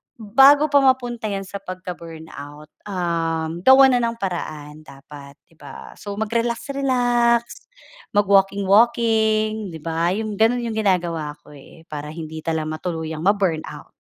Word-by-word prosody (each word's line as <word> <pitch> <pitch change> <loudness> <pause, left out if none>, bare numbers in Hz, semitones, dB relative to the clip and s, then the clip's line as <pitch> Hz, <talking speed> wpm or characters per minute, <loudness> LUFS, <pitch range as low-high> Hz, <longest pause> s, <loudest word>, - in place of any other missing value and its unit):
bago 270 +7 +5
pa 285 - +6
mapunta 245 -4 +1
'yan 195 -1 -3
sa 200 +1 -8
pagka-burnout, 160 -5 -9 0.2
um, 165 -3 -2
gawan 265 +3 +7
na 245 - +3
ng 230 - -6
paraan 155 -6 -5
dapat, 140 0 -13
'di 165 - -29
ba? 140 -2 -11
So, 205 -1 -6
mag 220 +1 -3
relax-relax, 240 0 +1 0.7
mag-walking-walking, 215 +1 +2
'di 160 - -8
ba? 165 +2 0
'Yung 215 -1 -4
ganun 240 +2 +2
ang 230 - -3
ginagawa 170 -7 -1
ko, - - -17
eh, 145 +3 -16
para 150 0 -6
hindi 160 -1 -7
talaga 160 -1 -2
matuluyang 160 -3 -4
ma-burnout. 190 -6 -1
195 Hz, 130 wpm, -21 LUFS, 160-230 Hz, 0.7 s, gawan